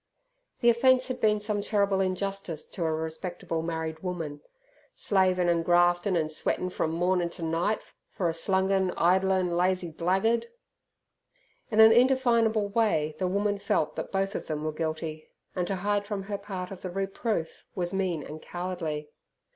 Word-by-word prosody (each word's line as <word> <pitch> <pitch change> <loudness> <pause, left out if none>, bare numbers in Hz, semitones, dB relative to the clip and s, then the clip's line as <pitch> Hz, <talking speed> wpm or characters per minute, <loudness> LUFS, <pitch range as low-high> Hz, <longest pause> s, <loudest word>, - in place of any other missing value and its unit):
The 240 - +6
offence 255 +2 +3
had 255 -1 -4
been 210 -1 +3
some 210 -1 -1
terrible 200 -2 +1
injustice 190 -3 -2
to 175 - -4
a 160 - +1
respectable 160 +1 -3
married 160 -1 -3
woman, 160 -5 -5 0.5
"slavin' 185 -3 +2
an' 170 -1 +3
graftin' 175 +2 +3
an' 155 -2 0
sweatin' 180 +3 -1
from 160 - -1
mornin' 175 +1 +1
ter 170 - -9
night, 165 +6 0 0.3
for 185 -5 -2
a 165 - 0
slungin' 190 +2 +1
idlin' 185 0 +2
lazy 180 -1 +1
blaggard." 190 - +1 1.2
In 215 - 0
an 220 0 +9
indefinable 235 -3 +3
way 200 -9 +1
the 185 - +1
woman 200 +2 0
felt 155 -5 0
that - - -5
both 195 +1 0
of - - -5
them 155 -1 -3
were 155 - -1
guilty, 155 0 -4 0.3
and 180 -2 -1
to 195 - -1
hide 205 +2 -1
from 205 -2 -3
her 200 +1 -4
part 190 -2 -6
of 190 - -8
the 185 - -4
reproof 195 -1 -3
was 175 -1 -2
mean 185 -6 -1
and 155 +1 -8
cowardly. 170 -4 -4
185 Hz, 165 wpm, -28 LUFS, 165-200 Hz, 1.2 s, an